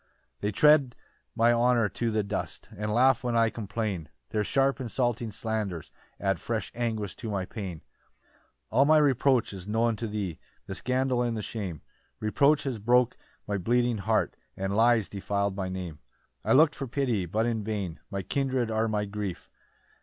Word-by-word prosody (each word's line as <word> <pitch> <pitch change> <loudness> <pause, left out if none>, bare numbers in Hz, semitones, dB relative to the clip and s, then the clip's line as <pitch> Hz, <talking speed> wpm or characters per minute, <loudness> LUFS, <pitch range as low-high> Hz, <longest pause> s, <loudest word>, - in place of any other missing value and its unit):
5 - - -43
"They 105 - 0
tread 145 +1 +5 0.4
my 115 +1 +4
honour 120 -1 +3
to 115 +3 -2
the 110 -1 +1
dust, 100 -1 -4
"And 105 +2 -3
laugh 130 +3 +4
when 120 -1 0
I 115 -1 +4
complain 100 -6 -3 0.2
"Their 105 -1 +1
sharp 135 +4 +1
insulting 120 -1 -1
slanders 105 -6 -3 0.3
add - - 0
"Fresh - - -3
anguish 110 -5 -2
to 115 - -5
my 100 -3 -1
pain. 90 -6 -6
6 - - -42 0.9
"All 130 +5 +5
my 155 +1 +6
reproach 135 -5 +3
is 95 -1 -8
known 115 +2 +1
to 115 - -3
thee, 100 -6 -4 0.3
"The 95 - -5
scandal 130 +3 0
and 120 -2 0
the 105 - -3
shame; 95 -9 -5 0.4
"Reproach 140 +8 +3
has 130 -5 -3
broke 120 +3 +3 0.3
my 100 -1 -1
bleeding 120 +3 +1
heart, 110 +3 +1 0.2
"And 95 +1 -2
lies 115 -1 +4
defil'd 100 0 -2
my 95 -1 -3
Name. 90 -5 -5 0.4
7 - - -6
"I - - +6
look'd 155 0 +6
for 135 - -5
pity, 120 -7 0
but 110 +6 0
in 115 -3 -1
vain; 100 -6 -3
"My 100 -2 -3
kindred 130 +1 0
are 110 +1 +1
my 105 -1 0
grief! 100 -3 -5
110 Hz, 180 wpm, -28 LUFS, 100-125 Hz, 0.9 s, my